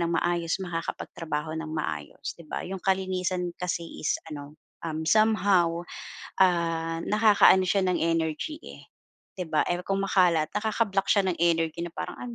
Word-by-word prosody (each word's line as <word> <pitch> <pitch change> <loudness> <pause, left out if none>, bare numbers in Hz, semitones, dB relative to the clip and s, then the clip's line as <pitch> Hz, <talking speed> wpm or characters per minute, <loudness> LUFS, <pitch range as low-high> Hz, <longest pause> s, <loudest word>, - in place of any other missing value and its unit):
ng 170 -1 +1
maayos, 170 -1 0
makakapagtrabaho 165 -2 -4
ng 160 - -6
maayos 80 - -4
'di 170 -2 -16
ba - - -4
'yong 190 +1 -5
kalinisan 185 -1 -1
kasi 175 -1 -2 0.2
is - - +1 0.2
ano, 145 +1 -8 0.2
um, 160 -1 -4
somehow, 190 -3 +3 0.5
ah, 165 -3 +2
nakakaano 210 -3 +5
siya 195 +2 +2
ng 185 -1 +1
energy, 165 - -1
eh - - -12 0.5
'di 180 -2 -4
ba? 155 - +2 0.2
Kung 195 0 0
makalat 175 -5 +3
nakaka-block 210 -2 0
siya 200 -2 +4
ng - - -1
energy 165 -1 +1
na 175 - -4
parang - - -5
"Ano 245 -1 -6
175 Hz, 150 wpm, -27 LUFS, 165-190 Hz, 0.5 s, nakakaano